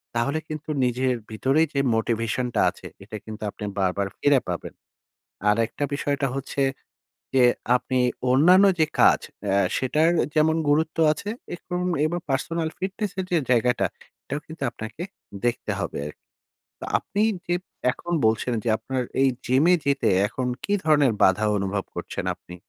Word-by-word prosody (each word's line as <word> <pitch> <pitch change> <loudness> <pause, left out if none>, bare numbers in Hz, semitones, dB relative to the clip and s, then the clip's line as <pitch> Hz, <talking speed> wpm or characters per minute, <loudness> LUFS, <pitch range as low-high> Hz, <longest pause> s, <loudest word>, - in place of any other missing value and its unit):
তাহলে 140 +7 0
কিন্তু 155 0 -6 0.2
নিজের 125 +1 +1 0.2
ভিতরেই 135 +8 +2
যে 140 - +1 0.2
মোটিভেশনটা 115 +2 0
আছে, - - -10 0.2
এটা 110 +2 -7
কিন্তু 110 -1 -8
আপনি 105 - -7
বারবার 95 +1 +1
ফিরে 145 -2 +4
পাবেন। - - -4 0.8
আরেকটা 115 +6 0
বিষয়টা 140 0 0
হচ্ছে 135 +1 -2 0.7
যে 130 -2 +6 0.3
আপনি 130 +1 -2 0.3
অন্যান্য 180 +9 +6
যে 160 - +4
কাজ, - - +6 0.2
অ্যা 100 -1 +2 0.2
সেটার 150 +5 +2
অ্যা - - +3
যেমন 160 +1 +3
গুরুত্ব 160 +2 +2
আ - - +5 0.4
এরকম 180 +1 -4 0.2
এবার 170 +3 -1
পার্সোনাল 160 +5 -1
ফিটনেসের 190 0 -3
যে 175 - +3
জায়গাটা, 125 0 +3 0.4
এটাও 145 - -4
কিন্তু 160 -1 -10
আপনাকে 120 +6 -7 0.4
দেখতে 120 0 -1
হবে - - -3
আরকি। 75 - -11 0.5
তো - - -6
আপনি 205 - -4 0.3
যে 175 - +1 0.4
এখন 175 - -7
বলছেন 110 +3 +1
যে, - - -1
আপনার 130 -1 -2 0.2
এই 135 - +5 0.2
জিমে 140 +8 +4
যেতে 140 0 +2 0.2
এখন 125 +4 -3 0.2
কী 205 - -1
ধরনের 145 -5 +4
বাধা 100 +3 +4
অনুভব 100 0 -2
করছেন - - -5
আপনি? 90 - -13
135 Hz, 150 wpm, -24 LUFS, 115-160 Hz, 0.8 s, যে